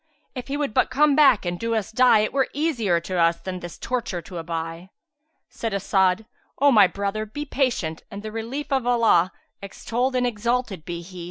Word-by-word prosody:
If 255 -2 -7
he 280 +1 -2
would 290 -7 -2
but - - +2
come 290 +2 +3
back 270 -9 +5
and 175 0 -3
do 230 0 -1
us 215 -3 -2
die, 245 -2 +5
it 215 - -2
were 270 -1 +2
easier 245 - +1
to 180 +1 -3
us 170 0 +3
than 185 -1 -6
this 175 -1 -9
torture 240 -7 -3
to 180 -3 -7
aby." 165 +2 -5 0.6
Said 230 -3 -5
As'ad, 190 +1 +1 0.3
"O 285 +1 +5
my 210 -6 +7
brother, 200 +3 -3
be 240 +8 -6
patient, 245 - -1
and 200 +1 -8
the 215 - -6
relief 235 +7 -5
of 265 -3 0
Allah 225 -7 +3 0.3
(extolled 240 +6 -2
and 250 0 +2
exalted 235 -6 -2
be 170 -1 -5
He!) 180 +1 -11
220 Hz, 195 wpm, -23 LUFS, 185-255 Hz, 0.6 s, my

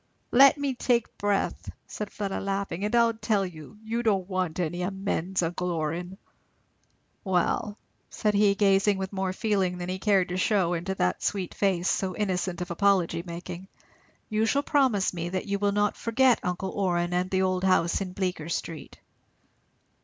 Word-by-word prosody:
"Let 275 +3 +7
me 285 -2 -1
take 240 -2 0
breath," 205 -1 -1 0.2
said 210 -1 -6
Fleda 200 -2 -3
laughing, 195 -2 -3
"and 210 +3 0
I'll 235 -1 +4
tell 215 -3 0
you. 165 +2 -10
You 230 +2 -2
don't 200 -6 +1
want 185 -3 -2
any 175 +1 -2
amends, 190 -1 -1
uncle 180 +2 -2
Orrin." 170 +3 -3 1.1
"Well," 190 +2 0 0.3
said 210 -1 0
he, 200 -1 +4
gazing 195 0 +3
with 190 +1 -4
more 190 -1 -1
feeling 195 -3 0
than 175 0 -5
he 185 +1 -3
cared 195 -3 +2
to 180 - -2
shew 185 -2 +2
into 175 +3 -2
that - - 0
sweet 190 -3 -2
face, 190 -3 +1
so 185 -2 0
innocent 185 -3 -2
of 175 0 -4
apology 175 -2 +2
making, 175 +1 -7 0.6
"you 220 +1 +1
shall 280 +5 +1
promise 260 -12 +2
me 170 0 -3
that 185 +1 -3
you 200 -1 -2
will 205 0 +2
not 205 0 +1
forget 250 +2 +3
uncle 180 +1 -3
Orrin 175 -3 0
and 180 +1 0
the 190 0 +1
old 185 0 0
house 185 -1 +2
in 185 -2 -4
Bleecker 180 -4 -3
street." 165 -2 -5
190 Hz, 170 wpm, -27 LUFS, 180-205 Hz, 1.1 s, Let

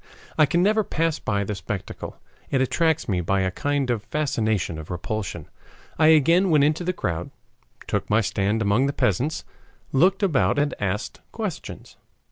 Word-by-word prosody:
I 150 - +5
can 170 +5 +2
never 215 +2 +3
pass 165 -4 -1
by 100 -1 -1
the 105 - -3
spectacle. 95 0 -6 0.3
It 135 - +1
attracts 160 +4 +1
me 95 -5 0
by 95 +3 +1
a 95 0 0
kind 140 +3 -1
of 115 -3 -1
fascination 110 - -1
of 80 - -9
repulsion. 90 -2 -4 0.5
I 155 - +6
again 165 +5 +5
went 150 -3 +4
into 155 +4 +1
the 180 - 0
crowd, 85 - -3 0.6
took - - -2
my 105 +2 +4
stand 105 +1 0
among 105 +7 +2
the 140 - -1
peasants, 130 - 0 0.5
looked 185 +9 +3
about 135 - +2
and 145 0 +1
asked 100 0 -3
questions. - - -6
130 Hz, 165 wpm, -24 LUFS, 100-155 Hz, 0.6 s, I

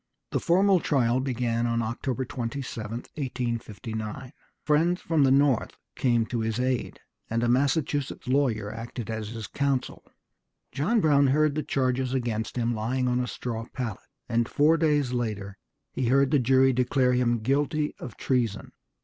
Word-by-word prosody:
The - - 0
formal 190 +2 +4
trial 125 -6 +2
began 120 -3 -1
on 115 0 0
October 125 +3 -3
27, 120 -3 -5
1859. 120 -1 -5 0.3
Friends 165 +4 +2
from 160 -3 +1
the 135 - +4
North 140 -3 +2 0.2
came 120 -3 +2
to 120 +1 -3
his 110 +1 -1
aid, 130 -1 -1 0.3
and 115 +1 0
a - - +2
Massachusetts 140 +2 0
lawyer 120 -6 +1
acted 115 0 -6
as 110 -1 -4
his 115 -1 -6
counsel. 140 +3 -2 0.7
John 180 - +1
Brown 145 -4 +4
heard 150 +2 +3
the 155 - -1
charges 130 -2 0
against 115 -3 -2
him 120 0 +1
lying 125 +4 -1
on 125 0 +1
a 125 - -1
straw 115 -2 -5
pallet, 120 -6 -4 0.3
and 115 +1 0
four 150 +3 +4
days 150 -5 +1
later 105 -5 -3 0.3
he 130 - -1
heard 135 +2 +3
the 145 - +4
jury 130 +1 +4
declare 125 +1 +2
him 120 -1 +2
guilty 145 +5 0
of 125 - -8
treason. 120 -6 -1
125 Hz, 155 wpm, -27 LUFS, 115-140 Hz, 0.7 s, formal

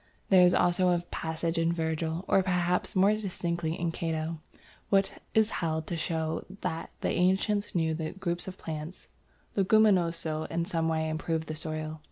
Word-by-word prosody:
There 190 -2 +7
is 180 0 +6
also 180 +1 +3
a 175 -1 +2
passage 165 +1 -2
in 165 0 +2
Virgil, 160 +1 -2
or 195 - +4
perhaps 180 -1 0
more 190 +2 +5
distinctly 170 -5 -2
in 170 -1 0
Cato, 165 -1 -3 0.5
which 195 -1 +3 0.2
is 220 0 +4
held 160 -1 -1
to 170 - -3
show 160 -1 -2 0.2
that 165 -2 -3
the - - 0
ancients 195 +3 +1
knew 160 -2 +2
that 155 0 -3
the 195 - -16
group 175 -1 -2
of 190 0 -6
plants, 155 +2 -6 0.5
Leguminosæ, 180 -6 +3
in 170 0 -1
some 165 -3 -1
way 160 -1 0
improved 160 0 -2
the 155 - -4
soil. 155 0 -4
170 Hz, 170 wpm, -29 LUFS, 160-185 Hz, 0.5 s, There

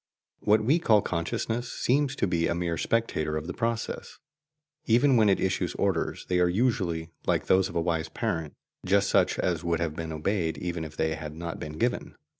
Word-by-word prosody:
What 105 +1 +3
we 145 +9 +3
call 110 -9 +4
"consciousness" 110 +8 -2
seems 140 +2 +1
to - - +1
be 85 -3 +1
a 85 - 0
mere 85 -1 -1
spectator 80 -9 0
of 75 - -4
the 90 - -4
process; 115 +1 -3 0.7
even 125 +4 +4
when 110 -3 +5
it 95 - +3
issues 95 -2 -1
orders, 95 -4 -1
they 90 -1 +1
are 90 0 +4
usually, 90 -6 0 0.2
like - - +1
those 95 0 +3
of - - -10
a 85 - +2
wise 80 -1 -1
parent, 85 -10 -3 0.3
just 100 +1 +2
such - - +3
as - - 0
would 85 -1 0
have 80 -2 -2
been 80 0 -4
obeyed 80 +1 -1
even 85 -2 -3
if 80 0 -10
they 80 0 +1
had 75 -1 -6
not 85 0 -5
been 75 - -6
given. - - -1
90 Hz, 200 wpm, -27 LUFS, 80-110 Hz, 0.7 s, when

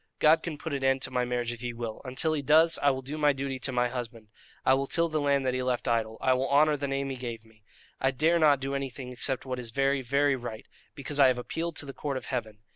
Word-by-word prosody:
God 155 +2 +5
can 160 -4 -5
put 160 0 -5
an 135 -1 -2
end 135 0 +2
to 130 - -1
my 125 -1 0
marriage 120 -1 -2
if 120 -1 -8
He 120 -1 -4
will; 115 -2 -6
until 135 +4 0
He 150 - -1
does, 160 +4 +4
I 145 - +4
will 130 -1 -2
do 150 +4 -5
my 150 -1 +4
duty 135 -1 -4
to 130 - -2
my 125 -1 +1
husband: 115 -3 -7 0.4
I 130 - +5
will 135 +1 0
till 170 +3 +1
the 155 -1 -1
land 140 -1 +2
that 130 - +1
he 130 - -1
left 125 -1 -1
idle; 110 -1 0
I 130 - +3
will 130 +1 -1
honour 150 +2 +4
the 140 0 -3
name 135 0 -2
he - - -4
gave 120 -3 -6
me. 110 -1 -23 0.4
I 130 - +2
dare 160 +6 +2
not 150 -4 +5
do 135 +1 -3
anything 135 -2 -5
except 130 +2 -1
what 130 -1 -4
is 120 -2 -6
very, 135 +2 +1
very 140 +2 +2
right, 120 -3 -7 0.3
because 145 +1 -3
I 135 - +8
have 130 -1 +2
appealed 165 +7 -4
to - - 0
the 135 - -7
Court 140 -1 -3
of - - -7
Heaven. 110 -5 -4
135 Hz, 275 wpm, -28 LUFS, 125-145 Hz, 0.4 s, I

